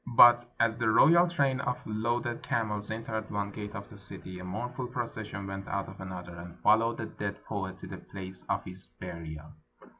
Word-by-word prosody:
But 120 0 +9
as 115 -1 +3
the 115 -2 +3
royal 170 +10 +7
train 140 -6 +2
of 125 -3 0
loaded 120 +2 -1
camels 105 -3 -1
entered 110 0 -3
one 100 0 -1
gate 105 0 -6
of - - -6
the - - -11
city, 90 -1 -7
a - - -7
mournful 125 +7 -3
procession 110 -5 -4
went 95 0 -5
out 100 0 -1
of 95 0 -10
another, 90 -2 -6
and 85 0 -9
followed 115 +2 +5
the 110 - -3
dead 100 -2 -5
poet 95 -3 -3
to - - -7
the - - -6
place 95 -1 -8
of - - +1
his 90 0 -9
burial. 80 -4 -7
105 Hz, 190 wpm, -31 LUFS, 95-120 Hz, -, But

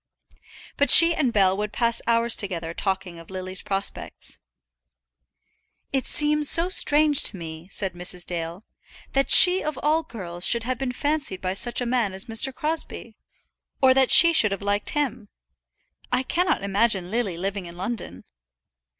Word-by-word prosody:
But 285 - +1
she 335 0 +9
and 270 -7 -1
Bell 190 -3 +1
would 210 0 -4
pass 235 +1 -1
hours 235 0 +2
together 170 -5 -2
talking 190 -2 -4
of 165 - -15
Lily's 185 0 -5
prospects. 195 0 -5 1.5
"It 270 -1 -2
seems 300 0 0
so 335 +2 +1
strange 300 -5 +3
to 195 - +3
me," 160 0 -10
said 195 -3 -3
Mrs. 175 0 +2
Dale, 170 +3 -6 0.5
"that 275 0 0
she 370 0 +7
of 305 -2 -5
all 310 +2 +1
girls 180 - -9
should 235 +3 +3
have 250 +1 -4
been 265 -2 -3
fancied 285 -7 -3
by 185 0 -4
such 240 +6 -1
a - - -3
man 235 -5 -1
as 190 +1 -4
Mr. 230 +3 0
Crosbie, 300 -6 -6 0.6
or 260 -1 +4
that 265 -1 +2
she 335 0 +7
should 215 -10 +3
have 200 0 -5
liked 205 0 -2
him. 250 -8 -4 0.8
I 250 +1 0
cannot 355 - -2
imagine 200 -2 0
Lily 215 -7 -3
living 195 0 -5
in 170 0 -13
London." 185 - -7
225 Hz, 160 wpm, -22 LUFS, 185-270 Hz, 1.5 s, she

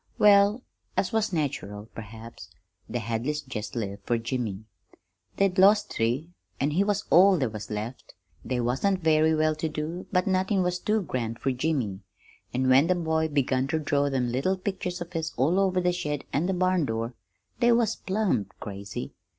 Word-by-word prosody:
"Well, 205 +3 +5 0.3
as 185 - +1
was 220 -2 +1
natural, 110 - -3
perhaps, 115 0 -10 0.4
the 120 - -2
Hadleys 120 +6 -2
jest 110 -3 -6
lived 100 -3 -4
fer 120 - +2
Jimmy. 115 -3 -3 0.7
They'd 195 -1 +2
lost 205 +2 +5
three, 125 +9 -1 0.3
an' 145 +2 +1
he 180 +6 +2
was 205 -1 0
all 190 +2 +7
there 130 -7 0
was 105 -1 -7
left. 110 +4 -6 0.3
They 125 -1 -2
wasn't 160 +11 0
very 160 0 +4
well 155 0 +2
to 155 +1 -3
do, 155 +4 -5
but 180 -1 +2
nothin' 190 0 +1
was 180 0 -1
too 215 +1 0
grand 115 -7 -3
fer 135 - -1
Jimmy, 125 -8 -1 0.5
and 130 +1 0
when 135 +4 +5
the 185 - +3
boy 160 -2 0
begun 135 -3 +1
ter 160 - 0
draw 145 -2 +1
them 125 -3 0
little 160 +10 0
pictures 185 -2 -4
of 175 +1 -7
his 160 -1 -3
all 155 +10 +3
over 190 -2 +2
the 180 0 +1
shed 150 -5 -3
an' 155 +5 +1
the 190 - +1
barn 185 -2 +2
door, 115 0 -3 0.5
they 240 -1 +4
was 230 -2 +2
plumb 185 - 0
crazy. 100 - -6
155 Hz, 180 wpm, -27 LUFS, 120-185 Hz, 0.7 s, all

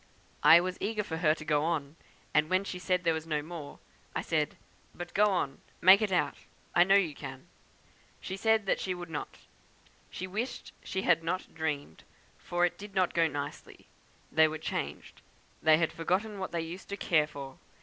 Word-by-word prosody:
I 165 - +9
was 185 +1 -3
eager 210 +1 -1
for 160 -5 -4
her 155 -2 +3
to 155 - -10
go 150 -1 +2
on, 155 -3 -1 0.4
and 150 +1 +3
when 185 +1 +2
she 185 -2 -5
said 180 0 0
there 165 -2 +3
was 160 0 -4
no 150 -2 -1
more, 160 -3 -8 0.4
I - - -1
said, 155 -2 0 0.4
'but 175 0 -7
go 210 - +5
on! 175 -9 -1 0.2
Make 190 +4 +8
it 210 -3 0
out! 180 - +1 0.4
I 175 - +7
know 195 +2 +5
you 180 -6 +3
can.' - - -9 0.7
She 190 - -5
said 220 0 +2
she 185 -1 -2
would 175 -2 -8
not; 150 - -5 0.7
she 185 - -5
wished 215 +7 -4
she 190 - -3
had 165 -2 +3
not 185 +3 -3
dreamed, 150 - -4 0.4
for 175 0 +1
it 175 - -3
did 200 -1 -10
not 185 -2 +2
go 165 -1 +4
on 155 - -2
nicely, 145 0 -6 0.5
they 160 0 +6
were 155 0 -4
changed; 155 - -5 0.4
they 155 -1 +6
had 165 0 0
forgotten 195 +5 -1
what 190 - -4
they 170 - -1
used 170 +3 -8
to 200 - -4
care 155 -6 +2
for. 140 -3 -9
170 Hz, 195 wpm, -30 LUFS, 155-190 Hz, 0.7 s, I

